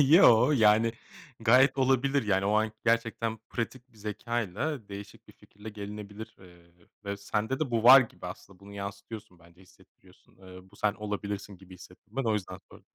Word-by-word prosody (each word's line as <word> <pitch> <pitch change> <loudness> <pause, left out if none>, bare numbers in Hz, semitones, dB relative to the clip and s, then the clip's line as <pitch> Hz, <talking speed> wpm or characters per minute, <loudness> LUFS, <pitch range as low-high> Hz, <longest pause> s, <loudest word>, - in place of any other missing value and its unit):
yo, 135 - +6
yani 110 -2 +4 0.5
gayet 125 +5 +5
olabilir. 135 +1 +2
Yani 95 -1 +1
o 100 - +1
an 110 0 +1
gerçekten 115 -1 0
pratik 125 +2 -5
bir - - -23
zekâyla 110 - -4
değişik 100 0 -10
bir - - -14
fikirle 105 +2 -14
gelinebilir, 105 +1 -9
eee, 85 -1 -20 0.2
ve 100 0 -3
sende 105 +6 -3
de 150 -5 -1
bu 115 -2 0
var 130 +3 +10
gibi 100 -7 -6
aslında. 90 +1 -10
Bunu 100 +1 -13
yansıtıyorsun 100 0 -8
bence, 85 +2 -21
hissettiriyorsun. 90 - -24
Eee, 95 0 -14
bu 100 - -19
sen 105 0 0
olabilirsin 105 -1 -5
gibi 95 0 -15
hissettim 90 +5 -17
ben, 135 - 0
o 110 - +1
yüzden 105 -3 -4
sordum. - - -17
105 Hz, 170 wpm, -28 LUFS, 100-115 Hz, 0.5 s, var